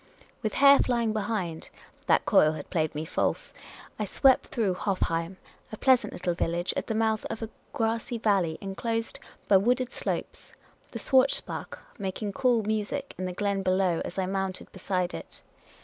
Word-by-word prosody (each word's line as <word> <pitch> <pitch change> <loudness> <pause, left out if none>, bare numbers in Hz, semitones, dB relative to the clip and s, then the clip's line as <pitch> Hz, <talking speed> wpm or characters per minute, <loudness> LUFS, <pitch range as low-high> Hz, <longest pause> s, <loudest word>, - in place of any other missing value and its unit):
With 215 - -2
hair 280 0 +7
flying 235 -3 +1
behind 200 -6 -3 0.2
— - - -30
that - - +3
coil 155 0 +5
had 150 -2 -8
played 155 -3 0
me 155 +1 -3
false— - - -1 0.5
I 210 - 0
swept 260 +6 +4
through 210 -6 0
Hofheim, 180 -2 -1 0.3
a 215 - -6
pleasant 260 0 +3
little 175 0 -2
village 170 +1 -1
at - - -3
the 225 - -1
mouth 220 -1 +1
of 225 0 -5
a 225 - -6 0.2
grassy 230 +1 -1
valley 195 -8 +1
inclosed 225 +4 -3 0.3
by 195 - +7
wooded 250 +5 +1
slopes, - - -5 0.4
the - - -6
Schwarzbach 270 - +1 0.2
making 200 +1 -3
cool 245 -3 +2
music 220 +6 -2
in 185 - -2
the 180 - -3
glen 200 +1 -1
below 185 -2 +1
as - - -7
I 190 - +1
mounted 190 0 -3
beside 180 -1 -2
it. - - -9
205 Hz, 165 wpm, -28 LUFS, 185-230 Hz, 0.5 s, hair